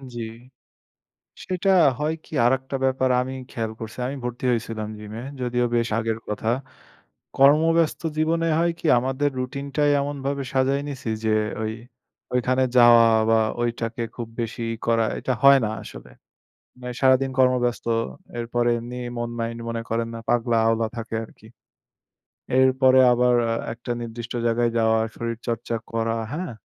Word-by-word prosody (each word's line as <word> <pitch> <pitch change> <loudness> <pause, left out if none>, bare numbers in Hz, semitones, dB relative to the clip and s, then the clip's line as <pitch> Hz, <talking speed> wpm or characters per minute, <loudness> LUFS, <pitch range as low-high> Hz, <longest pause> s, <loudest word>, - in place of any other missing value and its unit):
জি। 120 - -4 1.2
সেটা 185 +1 -1 0.3
হয় 150 +2 0
কি, - - -21
আরেকটা 130 +2 +1
ব্যাপার 130 0 +1
আমি 130 +1 -4 0.2
খেয়াল 110 -1 -3
করছি। 110 0 -8
আমি 140 - -4
ভর্তি 125 +1 -5
হয়েছিলাম 110 -2 -3
জিমে, 105 +2 -8 0.2
যদিও 125 0 0
বেশ 115 0 +1
আগের 115 0 -2
কথা। 105 +1 -4 0.9
কর্মব্যস্ত 155 +4 +4 0.2
জীবনে 165 +1 +1
হয় 170 0 +2
কি, - - -10
আমাদের 135 +3 0
রুটিন 135 +2 -4
টাই 145 -1 +3
এমনভাবে 140 -1 -3
সাজায় 135 +1 +2
নিছি 130 -4 -5 0.2
যে, 110 0 +3 0.3
ওই 110 0 -2 0.6
ঐখানে 130 +1 +2
যাওয়া 120 -1 +8 0.2
বা 115 - +5 0.2
ঐটাকে 115 0 -2
খুব 120 -2 -5
বেশি 115 +1 -5
ই - - -13
করা, 115 -1 +3
এটা 130 - -1
হয় 140 0 +8
না - - -1
আসলে, 65 - -11 0.7
মানে 125 0 -5
সারাদিন 130 0 +4
কর্মব্যস্ত। 125 -2 +2 0.5
এরপরে 120 0 0
এমনি 120 +1 -7 0.2
মন 120 0 -3
মাইন্ড 115 0 -3
মনে 115 0 -3
করেন, 115 0 -1
না, 115 - -5
পাগলা 120 -1 +2
আওলা 115 0 +2
থাকে 115 0 -5
আরকি। 110 - -17 1.1
এর 130 0 +6
পরে 130 0 +7
আবার 125 0 +3 0.4
একটা 120 +1 -9
নির্দিষ্ট 120 0 -6
জায়গায় 120 +1 +2
যাওয়া, 110 0 +3 0.2
শরীরচর্চা 115 0 -3 0.2
করা, 115 0 0 0.2
হ্যাঁ? 155 -10 -5
120 Hz, 145 wpm, -24 LUFS, 115-130 Hz, 1.2 s, যাওয়া